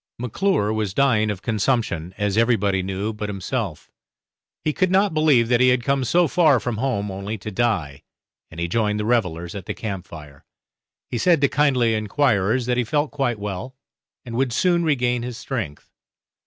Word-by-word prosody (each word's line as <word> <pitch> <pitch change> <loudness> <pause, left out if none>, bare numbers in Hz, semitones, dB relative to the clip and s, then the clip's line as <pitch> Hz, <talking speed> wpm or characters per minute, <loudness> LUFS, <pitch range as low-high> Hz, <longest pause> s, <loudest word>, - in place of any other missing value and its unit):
McClure 120 - 0
was 105 -3 -2
dying 115 -6 +3
of 100 -2 -4
consumption 105 -7 -1
as 105 -1 0
everybody 105 -4 +2
knew 95 +3 -3
but 105 -1 -5
himself; 100 - -4 0.7
he 155 - 0
could 185 +2 +1
not 195 0 +3
believe 150 -7 +4
that 120 0 +3
he 125 - +5
had 125 -1 +2
come 140 0 +1
so 170 +7 +3
far 155 -5 +4
from 120 -2 -3
home 105 -5 -1
only 100 +3 -5
to 110 +2 -7
die, 90 -11 -1 0.5
and 80 - -10
he 85 - -1
joined 105 +2 0
the 105 - -2
revellers 90 -8 0
at 100 -3 -8
the - - -3
camp 95 -5 -5
fire. 75 -4 -12 0.7
He 120 - -2
said 175 +2 +4
to 140 - +5
kindly 130 -6 +2
enquirers 110 0 +1
that 125 0 0
he 125 - +2
felt 145 +5 -1
quite 135 -5 -1
well, 105 +5 -5 0.5
and 120 - -7
would 130 0 +1
soon 175 +4 +2
regain 125 -6 +1
his 120 -1 -5
strength. 110 - -5
115 Hz, 180 wpm, -22 LUFS, 100-130 Hz, 0.7 s, he